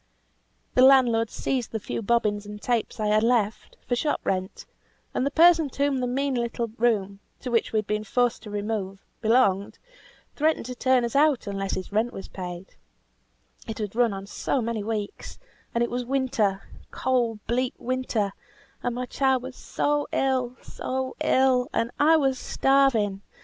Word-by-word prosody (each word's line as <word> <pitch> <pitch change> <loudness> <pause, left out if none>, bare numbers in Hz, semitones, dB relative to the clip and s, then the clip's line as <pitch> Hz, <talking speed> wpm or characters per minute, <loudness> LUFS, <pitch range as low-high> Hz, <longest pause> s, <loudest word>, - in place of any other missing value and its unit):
The 255 - +4
landlord 245 -4 +5
seized 255 -4 -2
the 220 - -2
few 210 - -4
bobbins 210 -2 0
and 210 0 -8
tapes 235 +1 -1
I 215 - 0
had 210 +1 +3
left, 225 -2 0
for 245 - +1
shop 295 +4 0
rent; 185 0 -3 0.5
and 260 - 0
the - - +1
person 330 0 +5
to 280 +2 0
whom 275 -2 0
the 250 - -1
mean 275 +2 0
little 235 -1 -2
room, 200 -4 +1 0.2
to 250 - -5
which 230 - +1
we 220 - 0
had 215 - 0
been 210 +1 -1
forced 245 +1 0
to 215 - -10
remove, 205 -2 -4 0.2
belonged, 215 -4 +2 0.6
threatened 310 -4 +1
to 250 - -5
turn 255 0 +2
us 235 - -5
out 290 -4 +3
unless 195 -1 -2
his 185 - -6
rent 220 +4 0
was 195 - -7
paid; 180 0 -8 0.9
it 220 - -5
had 210 -1 -4
run 240 -2 +3
on 195 0 -6 0.4
many 230 -3 -2
weeks, 210 -1 -5 0.4
and 235 - +3
it 235 - -2
was 245 +1 -1
winter, 240 -7 0 0.3
cold 240 -4 0
bleak 250 +1 0
winter; 240 -5 -1 0.5
and 245 -1 -2
my 250 +1 -3
child 265 0 +1
was 260 0 -7
so 290 0 -1
ill, 255 -2 0
so 260 0 -4
ill, 260 -1 +3
and 230 +1 0
I 320 +2 +6
was 270 -4 +1
starving. 245 -8 +2
235 Hz, 170 wpm, -25 LUFS, 210-260 Hz, 0.9 s, I